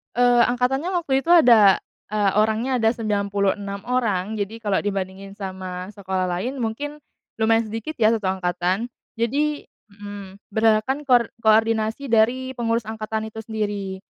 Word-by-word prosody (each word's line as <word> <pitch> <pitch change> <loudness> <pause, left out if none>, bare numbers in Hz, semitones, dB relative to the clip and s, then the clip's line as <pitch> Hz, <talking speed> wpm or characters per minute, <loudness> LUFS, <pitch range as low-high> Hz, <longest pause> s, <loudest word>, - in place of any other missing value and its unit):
Eee, 245 0 +5
angkatannya 255 +8 0
waktu 285 -7 0
itu 330 - -6
ada 235 - +7 0.3
e 215 - -2 0.2
orangnya 220 +5 +1
ada 225 -2 +3
96 200 -2 -1
orang. 220 -5 0
Jadi, 210 +2 -4
kalau 205 -3 0
dibandingin 195 -1 -4
sama 185 -2 -6
sekolah 190 -2 -2
lain, 225 +10 -3
mungkin 285 +6 -4 0.4
lumayan 225 +1 +3
sedikit, 225 +8 -5
ya, 220 -3 +4
satu 220 -4 -1
angkatan. 185 +4 -1 0.2
Jadi 290 +6 0 0.3
mmm, 200 -1 -9 0.2
berdasarkan 220 +6 +2
kor 245 -3 +4 0.2
koordinasi 220 +3 +2
dari 245 +4 +2
pengurus 230 -1 0
angkatan 220 0 -4
itu 220 - -8
sendiri. 205 -3 -4
220 Hz, 135 wpm, -23 LUFS, 200-245 Hz, 0.4 s, ada